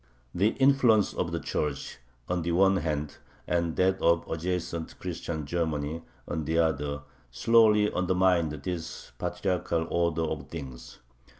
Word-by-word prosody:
The 100 +5 +2
influence 130 -6 +4
of 85 - -2
the 85 - -1
Church, 75 -4 -3 0.3
on 90 -1 -1
the 85 +1 -1
one 95 +2 +4
hand, 75 -4 -2 0.3
and 85 -2 0
that 95 +1 +2
of 85 0 +3
adjacent 85 0 -3
Christian 85 -3 -4
Germany, 80 0 -2 0.3
on 80 - -3
the 80 +3 0
other, 75 -3 0 0.3
slowly 105 - +4
undermined 90 -2 +2
this 80 +3 -6
patriarchal 90 -3 -1
order 85 -1 +1
of 75 -4 -4
things. 65 -6 -8
85 Hz, 130 wpm, -28 LUFS, 75-90 Hz, 0.3 s, influence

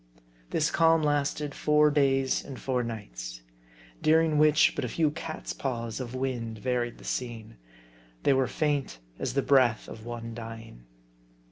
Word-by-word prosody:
This 155 -1 +1
calm 165 -1 +4
lasted 145 0 0
four 150 0 +3
days 135 -2 +2
and 135 - -8
four 130 -2 0
nights; - - -6 0.6
during 160 -1 +4
which, 150 0 +5
but - - -2
a - - -1
few 155 -3 +1
cat's 155 +1 -6
paws 115 -4 -3
of 125 -1 -5
wind 120 -4 -3
varied 120 0 -1
the - - -15
scene. 115 - -5 0.7
They 140 - +4
were 130 -1 +2
faint 145 - -1 0.2
as - - -3
the 140 - +2
breath 130 -5 +3
of 110 - -9
one 115 -1 -6
dying. 115 - -9
130 Hz, 150 wpm, -28 LUFS, 115-150 Hz, 0.7 s, which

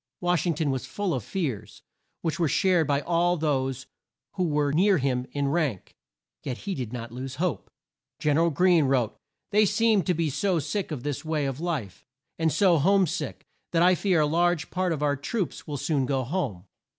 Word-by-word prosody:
Wash 175 -1 +1
ing 170 - +1
ton 150 -2 0
was 130 0 -3
full 190 +6 -2
of 125 - -2
fears, 125 - -4 0.4
which 165 0 -1
were 165 - +3
shared 175 +1 +2
by 140 -1 +1
all 175 +2 +1
those 135 -4 -1 0.5
who 185 - -1
were 145 -2 +1
near 190 +4 +4
him 130 -3 -1
in 140 -1 -1
rank, 145 - -1 0.5
yet 125 -3 -4
he 200 - -4
did 125 - -4
not 115 -2 -6
lose 130 +2 -6
hope. 170 +2 -2 0.5
Gen 150 -1 +1
er 165 - +4
al - - +3
Greene 170 0 +4
wrote, 130 -5 +1 0.4
"They 210 +1 +5
seem 210 0 +3
to 180 - +1
be 160 -2 0
so 190 +4 +1
sick 160 +6 -2
of 145 -6 -5
this 145 -2 -3
way 155 -2 -1
of 135 0 -3
life, 155 - -4 0.4
and 160 -1 +2
so 175 0 +4
home 195 +5 +4
sick, 155 - -4 0.3
that 165 0 +4
I 180 +1 +6
fear 180 -2 +2
a - - +4
large 170 0 +1
part 185 -1 0
of 150 -2 -2
our 145 -1 +2
best 145 - -12
troops 210 -8 -3
will 145 -2 -3
soon 140 -1 0
go 135 -1 0
home." 125 - -3
155 Hz, 210 wpm, -26 LUFS, 135-175 Hz, 0.5 s, I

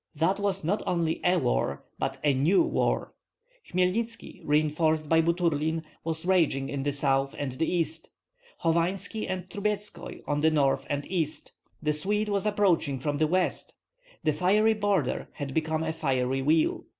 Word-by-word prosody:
That 165 +6 +1
was 195 -2 -1
not 195 +7 0
only 165 -2 0
a 180 +1 +4
war, 70 - 0
but - - -2
a 145 -2 +4
new 150 - +4
war. 330 - 0 0.6
Hmelnitski, 220 +6 -1
reinforced 155 +1 +1
by 165 +1 +4
Buturlin, 165 -2 0 0.2
was 160 0 -3
raging 160 -7 +2
in 140 -1 -3
the 145 +1 0
south 135 -1 0
and 140 -2 -2
the 155 +6 -1
east; 165 -2 -2 0.5
Hovanski 175 +6 0
and 185 -1 -3
Trubetskoi 210 +2 -4
on 145 0 -1
the 160 - +5
north 140 -3 +1
and 145 0 -2
east; 165 -4 -2 0.3
the 150 0 +2
Swede 210 +7 -1
was 200 0 0
approaching 185 -9 +2
from 145 +2 -2
the 155 - +3
west! 185 +3 -1 0.5
The 155 - +2
fiery 205 +8 +3
border 200 -10 0
had 140 -2 -5
become 160 0 0
a 160 0 -2
fiery 135 -4 0
wheel. 155 +3 +2
160 Hz, 160 wpm, -28 LUFS, 145-185 Hz, 0.6 s, the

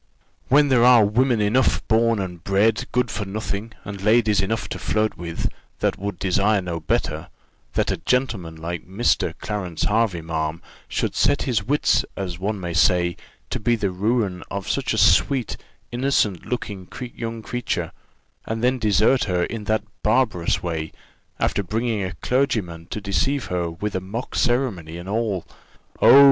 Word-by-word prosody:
"When 145 +2 +5
there 125 -3 +5
are 120 -3 +7
women 120 +3 +2
enough 115 +5 +2
born 115 +1 +3
and 90 -3 -5
bred 105 +5 +2
good 125 -2 +1
for 105 - -3
nothing, 105 +2 -4
and 100 -1 -6
ladies 110 -1 +4
enough 105 +3 -2
to - - -5
flirt 110 0 0
with, 85 -1 -3 0.3
that - - 0
would 100 -1 -4
desire 100 +3 +2
no 90 -3 -3
better, 75 -1 -1 0.4
that - - +1
a - - -1
gentleman 110 -11 -1
like 85 +1 -5
Mr. 100 +6 +1
Clarence 95 -6 -3
Hervey, 105 -5 +1
ma'am, 80 0 -2 0.3
should - - -1
set 145 0 +2
his 125 -5 +1
wits, 145 +3 +2
as 90 -3 -4
one 100 +2 -2
may 85 -2 -4
say, 85 0 +3 0.4
to - - -1
be 120 +2 +2
the 100 -4 -1
ruin 100 -1 0
of 100 -1 -4
such - - 0
a - - 0
sweet, 130 -5 +3 0.4
innocent 120 -7 +1
looking 105 -6 -4 0.3
young 115 -1 -5
creature, 125 +1 -2 0.6
and 110 +1 -3
then 130 +1 +2
desert 110 +4 +3
her 90 -3 +1
in 110 +1 -4
that 110 0 +1 0.2
barbarous 110 -6 +1
way, 80 -3 -3 0.5
after - - +1
bringing 110 +3 -1
a 90 0 -3
clergyman 100 -11 0
to - - -4
deceive 100 - 0
her 85 -1 0
with 100 +5 -4
a 95 - -1
mock 110 +7 -5
ceremony, 105 -11 0
and 85 +1 -8
all 105 -3 -1 0.6
oh! 140 - +9
105 Hz, 165 wpm, -23 LUFS, 90-115 Hz, 0.6 s, oh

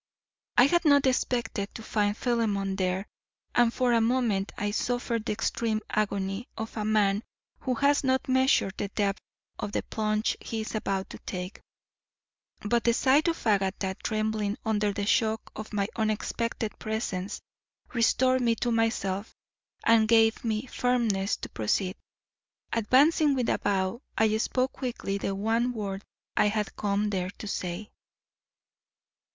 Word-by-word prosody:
I - - +9
had 345 +6 +3
not 285 -3 +5
expected 240 -5 0
to 225 - -7
find 210 -1 0
Philemon 210 -5 0
there, 185 0 -1 0.5
and 240 -1 +4
for 245 0 +1
a 230 - +4
moment 225 -4 +1
I 205 0 -1
suffered 235 0 -1
the 215 - 0
extreme 225 0 -1
agony 200 +1 -1
of 220 0 -5
a 215 - -2
man 210 -1 +2 0.4
who 255 -2 -1
has 285 +4 +3
not 260 0 +1
measured 260 -7 +3
the 205 - -2
depth 200 0 -1 0.4
of 205 - -4
the - - 0
plunge 215 0 -1
he 225 -1 -3
is 215 - -6
about 195 -3 -2
to - - -9
take; 180 +1 -6 1.0
but 235 +2 +2
the 235 -1 +3
sight 280 +6 +4
of 330 -5 -1
Agatha 195 -2 +1
trembling 215 -1 -1
under 210 -1 +1
the 200 0 -3
shock 220 0 +1
of 215 - -7
my 200 -2 0
unexpected 220 0 -2
presence 210 -3 -3 0.5
restored 255 +2 +3
me 230 -2 +3
to 240 +2 -1
myself 225 -3 0 0.5
and 225 -1 +5
gave 225 0 +4
me 220 +1 -1
firmness 230 -6 +1
to - - -7
proceed. 185 - -1 0.8
Advancing 275 +6 +4
with 250 -3 0
a - - +1
bow, 195 +3 0 0.2
I 220 -1 +3
spoke 255 +3 0
quickly 230 -6 -3
the 195 0 -2
one 225 +5 +1
word 200 -3 -4 0.3
I - - +4
had 210 -1 -1
come 205 0 0
there 185 -2 -1
to 210 - -7
say. 185 +1 -4
220 Hz, 150 wpm, -28 LUFS, 200-240 Hz, 1.0 s, I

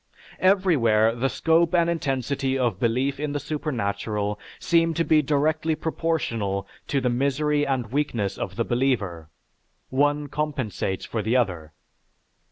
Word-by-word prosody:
Everywhere 140 - +3
the 130 +3 0
scope 165 +6 +2
and 170 -1 +4
intensity 135 -4 -1
of 125 -3 0
belief 130 +4 0
in 150 -1 -2
the 145 - -1
supernatural 105 -8 -2 0.2
seem 165 -1 +2
to 165 - +2
be 155 -2 +4
directly 155 +2 +1
proportional 115 -13 -2 0.2
to 140 - +1
the 125 - 0
misery 145 +3 +1
and 125 -5 -1
weakness 120 -9 -1
of 95 - -4
the 115 +1 0
believer 105 - -1 0.6
(one 145 +2 +1
compensates 135 -10 -2
for 110 - -3
the 110 +4 0
other). 85 -10 -1
135 Hz, 135 wpm, -25 LUFS, 110-150 Hz, 0.6 s, and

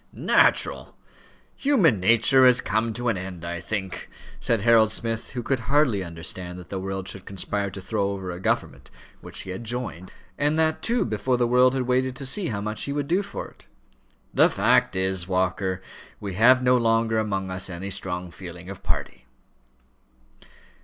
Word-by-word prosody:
"Natural! - - +2 0.6
Human 200 - +3
nature 115 +6 +4
has 125 -1 +6
come 110 +1 0
to 120 +2 -3
an 105 -5 -1
end, 90 -2 -7
I 85 0 -4
think," 95 -3 -5 0.3
said 115 -3 +1
Harold 110 -1 +5
Smith, 115 +2 -3
who 125 -2 -4
could 135 +1 0
hardly 135 -9 +3
understand 90 +1 -5
that 90 -1 -11
the 95 - -4
world 95 0 -4
should 95 -1 -7
conspire 100 +1 -3
to 95 - -9
throw 100 +1 -1
over 95 -2 -4
a 90 - -7
government - - -2 0.3
which - - -6
he 95 - -7
had 95 +5 -6
joined, 115 -6 -5 0.3
and 150 +2 +2
that, 160 0 +1
too, 235 +1 +1
before 115 +3 0
the 120 - +2
world 125 +2 +4
had 130 - 0
waited 130 +1 0
to 135 - -5
see 175 +8 +1
how 100 -3 -3
much 105 +1 -3
he 140 - -3
would 145 -1 -2
do 180 +5 +2
for 200 - -6
it; - - -23 0.7
"the - - +5
fact - - +2
is 95 0 +1
this, 85 - -3
Walker, 95 0 -1 0.4
we 100 -2 -5
have 125 +6 +5
no 125 0 +4
longer 115 -1 +2
among 95 -3 -2
us 95 +1 -3
any 95 +2 -5
strong 90 -2 -4
feeling 90 +1 -9
of 100 - -10
party." - - -4
105 Hz, 185 wpm, -25 LUFS, 95-125 Hz, 0.7 s, has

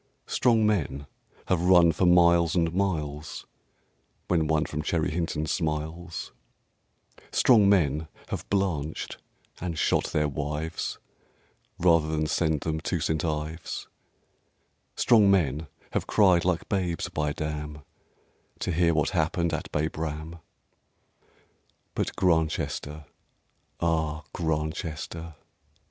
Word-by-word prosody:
Strong 115 -3 +3
men 75 -9 0 0.4
have 90 -3 +1
run 90 -2 +6
for 90 +3 +1
miles 85 -1 +5
and 85 -2 +1
miles, 80 -5 -2 0.8
When 80 -3 +2
one 80 0 +2
from 75 - -4
Cherry 80 +1 0
Hinton 80 -2 -2
smiles; 80 +1 -3 1.0
Strong 110 -6 +5
men 80 -5 +2 0.2
have - - -5
blanched, 85 -7 -1 0.4
and 85 -2 -4
shot - - +2
their 75 -1 0
wives, 75 +3 -3 0.8
Rather 85 -3 +4
than 80 0 0
send 80 -1 0
them 80 -1 -2
to 85 +2 -2
St. 80 +2 -1
Ives; 80 0 -4 1.1
Strong 110 -4 +5
men 80 -5 +2 0.2
have - - -2
cried 95 -5 +4
like 90 -2 0
babes, 90 -4 -1
bydam, 75 0 -3 0.8
To - - -1
hear 85 0 +2
what 75 - +1
happened 85 0 0
at 80 - -4
Babraham. 80 +1 -3 1.5
But - - -2
Grantchester! 80 -3 0 0.7
ah, 80 -2 0
Grantchester! 80 0 -3
80 Hz, 105 wpm, -27 LUFS, 75-85 Hz, 1.5 s, run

